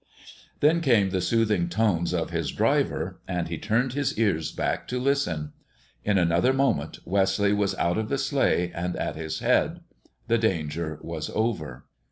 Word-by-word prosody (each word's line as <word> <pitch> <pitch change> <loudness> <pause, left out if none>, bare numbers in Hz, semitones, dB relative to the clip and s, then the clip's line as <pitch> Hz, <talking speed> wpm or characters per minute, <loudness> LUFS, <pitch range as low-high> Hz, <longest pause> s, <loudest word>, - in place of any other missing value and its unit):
Then 160 +3 +4
came 115 - +3
the 95 -1 0
soothing 115 - +1
tones 100 - +1
of 85 -1 -1
his 80 -4 -1
driver, - - 0
and 90 -3 -2
he 80 -2 -4
turned 125 +3 0
his 145 -4 -1
ears 100 -8 +1
back - - -2
to 125 - -2
listen. 125 - 0 0.5
In 105 -1 +2
another 85 +8 +3
moment 130 - 0
Wesley 100 +1 +2
was 100 -1 0
out 85 +3 0
of 110 0 -3
the 140 - 0
sleigh 135 -10 +1
and 90 +1 -3
at - - -3
his 80 0 -4
head. - - +2 0.5
The 115 0 +3
danger 80 -6 -1
was 80 -2 -5
over. 80 - -2
100 Hz, 165 wpm, -26 LUFS, 85-115 Hz, 0.5 s, Then